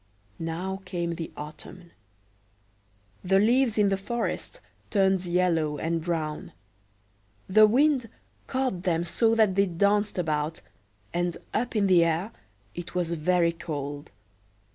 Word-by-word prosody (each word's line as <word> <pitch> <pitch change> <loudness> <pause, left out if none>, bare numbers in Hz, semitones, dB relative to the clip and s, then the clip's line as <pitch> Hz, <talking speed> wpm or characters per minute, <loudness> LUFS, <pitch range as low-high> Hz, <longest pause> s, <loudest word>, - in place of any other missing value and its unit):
Now 180 +4 -4
came 170 -3 -3
the 165 -1 -6
autumn. 165 +3 -9 1.3
The 190 +1 +3
leaves 235 +3 +3
in 205 -1 +4
the 195 - +1
forest 235 - -3 0.3
turned 190 -2 +2
yellow 170 -4 +1
and 165 +1 -2
brown; 160 -3 -3 0.9
the 215 +3 +7
wind 260 0 +2 0.4
caught 260 -9 -1
them 175 -2 0
so 225 +5 +2
that 215 -4 +4
they 200 +1 +3
danced 200 +4 +1
about, 155 -2 -1 0.5
and 175 -1 -1 0.2
up 240 +2 -1
in 210 -2 +3
the 180 -3 +5
air 165 +6 0 0.4
it 175 0 -8
was 175 -2 0
very 170 +1 +2
cold. 145 -3 -6
180 Hz, 125 wpm, -27 LUFS, 165-205 Hz, 1.3 s, the